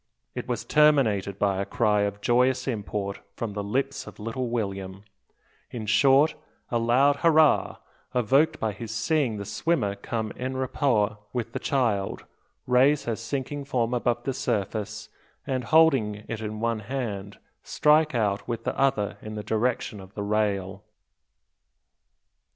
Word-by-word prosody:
It -, -, -5 dB
was -, -, -3 dB
terminated 120 Hz, -11 st, +3 dB
by 100 Hz, -2 st, +1 dB
a -, -, 0 dB
cry 105 Hz, +1 st, +1 dB
of 100 Hz, 0 st, -2 dB
joyous 125 Hz, +3 st, +2 dB
import 105 Hz, -4 st, -3 dB, 0.2 s
from 115 Hz, -3 st, -4 dB
the 105 Hz, 0 st, -3 dB
lips 135 Hz, +6 st, -2 dB
of -, -, -11 dB
little 115 Hz, +3 st, -3 dB
William, 100 Hz, -4 st, -4 dB, 0.7 s
in 115 Hz, -3 st, -6 dB
short, 135 Hz, +7 st, +4 dB, 0.4 s
a 120 Hz, -, +2 dB
loud 130 Hz, +5 st, +3 dB
hurrah, 160 Hz, -2 st, +4 dB, 0.4 s
evoked 140 Hz, +7 st, +3 dB
by 110 Hz, -, 0 dB
his 110 Hz, +3 st, -8 dB
seeing 120 Hz, +1 st, 0 dB
the 100 Hz, -, -5 dB
swimmer 130 Hz, -, 0 dB
come 110 Hz, +1 st, -4 dB
en 130 Hz, +1 st, -3 dB
rapport 120 Hz, -6 st, +1 dB
with 120 Hz, -2 st, -3 dB
the -, -, -2 dB
child, 115 Hz, -8 st, -1 dB, 0.4 s
raise 130 Hz, +4 st, +4 dB
her 115 Hz, -, -2 dB
sinking 135 Hz, +5 st, -4 dB
form 125 Hz, -3 st, -1 dB
above 120 Hz, -1 st, 0 dB
the 135 Hz, -, -1 dB
surface, 110 Hz, -4 st, -3 dB, 0.4 s
and 130 Hz, -2 st, -2 dB
holding 115 Hz, -10 st, +3 dB
it 110 Hz, -1 st, -5 dB
in 105 Hz, 0 st, -5 dB
one 115 Hz, 0 st, 0 dB
hand, 105 Hz, -5 st, -5 dB, 0.2 s
strike 155 Hz, -1 st, +3 dB
out 100 Hz, -3 st, 0 dB
with 115 Hz, -1 st, -3 dB
the -, -, -2 dB
other 125 Hz, -7 st, 0 dB
in 110 Hz, 0 st, -7 dB
the 105 Hz, -, -5 dB
direction 110 Hz, -1 st, -1 dB
of 95 Hz, +1 st, -13 dB
the 100 Hz, -, -3 dB
rail. 100 Hz, -2 st, -1 dB
115 Hz, 150 wpm, -26 LUFS, 105-130 Hz, 0.7 s, short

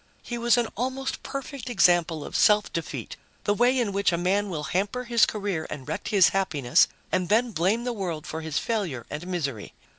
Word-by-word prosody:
He 240 Hz, -1 st, -5 dB
was 240 Hz, +1 st, +4 dB
an 240 Hz, -1 st, +1 dB
almost 260 Hz, +3 st, -3 dB
perfect 275 Hz, -2 st, -6 dB
example 175 Hz, -8 st, +3 dB
of -, -, -8 dB
self 210 Hz, 0 st, +4 dB
defeat, 165 Hz, -2 st, -5 dB, 0.3 s
the 205 Hz, -, +2 dB
way 245 Hz, +4 st, +3 dB
in 235 Hz, -5 st, +1 dB
which 200 Hz, -1 st, +2 dB
a 170 Hz, -, 0 dB
man 195 Hz, +4 st, +1 dB
will 155 Hz, -5 st, -4 dB
hamper 200 Hz, -, -1 dB
his 235 Hz, -2 st, +4 dB
career 200 Hz, -7 st, -3 dB
and 135 Hz, -4 st, -7 dB
wreck -, -, -4 dB
his 195 Hz, -4 st, +5 dB
happiness, 150 Hz, -10 st, +2 dB, 0.2 s
and 185 Hz, -1 st, 0 dB
then 235 Hz, +3 st, +3 dB
blame 195 Hz, +6 st, +1 dB
the 245 Hz, 0 st, -2 dB
world 175 Hz, -8 st, -4 dB
for 160 Hz, -, -5 dB
his 160 Hz, -1 st, -3 dB
failure 180 Hz, -, -2 dB
and 150 Hz, +4 st, -5 dB
misery. 140 Hz, -, -4 dB
195 Hz, 200 wpm, -26 LUFS, 165-235 Hz, 0.3 s, his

